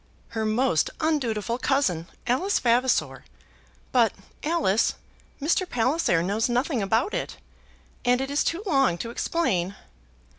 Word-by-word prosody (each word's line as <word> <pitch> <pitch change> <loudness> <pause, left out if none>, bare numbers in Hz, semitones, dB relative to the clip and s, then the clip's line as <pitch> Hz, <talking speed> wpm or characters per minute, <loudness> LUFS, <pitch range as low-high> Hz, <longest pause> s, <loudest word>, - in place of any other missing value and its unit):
"Her 220 -1 -2
most 215 - +2
undutiful 245 -7 0
cousin, 195 - +1 0.2
Alice 265 +12 +1
Vavasor. 245 +1 +1 0.7
But, 235 -5 +3 0.3
Alice, 300 - +1 0.4
Mr. 340 +5 +1
Palliser 240 - +1
knows 210 +6 0
nothing 245 +1 0
about 225 - +1
it, - - -3 0.7
and 245 0 +3
it 270 +1 -3
is 285 - +2
too 340 +5 -2
long 270 - +2
to 230 +5 -5
explain." 200 - -1
245 Hz, 120 wpm, -25 LUFS, 215-285 Hz, 0.7 s, But